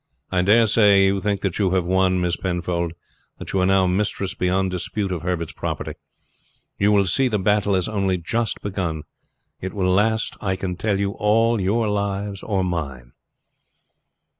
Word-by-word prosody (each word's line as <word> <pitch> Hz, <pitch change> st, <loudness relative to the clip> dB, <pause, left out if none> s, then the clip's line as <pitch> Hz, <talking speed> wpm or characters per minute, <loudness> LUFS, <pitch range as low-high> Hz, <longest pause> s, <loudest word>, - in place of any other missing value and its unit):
I 90 Hz, -1 st, +2 dB
dare 110 Hz, +5 st, +5 dB
say 100 Hz, -2 st, +5 dB
you 95 Hz, 0 st, +1 dB
think 100 Hz, 0 st, -1 dB
that 95 Hz, -1 st, -2 dB
you 95 Hz, -2 st, +2 dB
have 90 Hz, -2 st, +1 dB
won, 95 Hz, 0 st, +2 dB
Miss 90 Hz, -1 st, 0 dB
Penfold; 85 Hz, -2 st, -2 dB, 0.4 s
that -, -, -8 dB
you 95 Hz, -, +2 dB
are 90 Hz, -, +2 dB
now 95 Hz, -1 st, +4 dB
mistress 95 Hz, +1 st, -1 dB
beyond 95 Hz, -1 st, 0 dB
dispute 95 Hz, +2 st, -3 dB
of 90 Hz, -3 st, -3 dB
Herbert's 85 Hz, -2 st, -3 dB
property. -, -, -4 dB, 0.9 s
You 100 Hz, +1 st, +3 dB
will 100 Hz, -1 st, +4 dB
see 130 Hz, +9 st, +2 dB
the 110 Hz, -4 st, 0 dB
battle 105 Hz, 0 st, +2 dB
has 90 Hz, -2 st, 0 dB
only 95 Hz, -3 st, 0 dB
just 115 Hz, +6 st, -2 dB
begun. 90 Hz, -6 st, -3 dB, 0.6 s
It 95 Hz, 0 st, -5 dB
will 95 Hz, -2 st, +1 dB
last, 110 Hz, +3 st, +1 dB
I 95 Hz, -2 st, 0 dB
can 95 Hz, -1 st, -4 dB
tell 100 Hz, +1 st, -1 dB
you, 100 Hz, 0 st, 0 dB
all 110 Hz, +2 st, +2 dB
your 110 Hz, +4 st, +1 dB
lives 100 Hz, -1 st, -2 dB
or 100 Hz, -3 st, -1 dB
mine." 70 Hz, -9 st, -4 dB
95 Hz, 175 wpm, -22 LUFS, 90-105 Hz, 0.9 s, dare